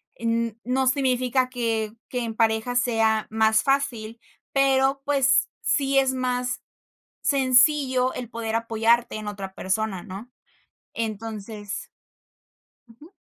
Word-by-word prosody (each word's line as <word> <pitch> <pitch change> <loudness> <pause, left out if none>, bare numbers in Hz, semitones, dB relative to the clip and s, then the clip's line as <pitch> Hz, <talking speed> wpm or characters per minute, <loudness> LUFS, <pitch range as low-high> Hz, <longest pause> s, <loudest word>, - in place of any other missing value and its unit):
n 230 -1 -1
no 260 +1 0
significa 255 -1 +1
que 225 -3 -2 0.2
que 250 - -2
en 225 -1 -4
pareja 225 +2 +1
sea 225 -3 +2
más 220 0 +3
fácil, 235 -5 -1 0.3
pero, 270 0 +3
pues, 275 -2 +3
sí 275 -1 +1
es 265 -1 +1
más 250 -1 -2 0.6
sencillo 260 -1 +3
el 245 -2 -6
poder 230 -1 -4
apoyarte 230 +1 +1
en 215 -1 -7
otra 195 -2 -7
persona, 195 -1 -2
¿no? 205 +5 -9 0.7
Entonces 215 -2 -5 1.0
Ujú. 295 - -17
235 Hz, 115 wpm, -24 LUFS, 220-260 Hz, 1.0 s, más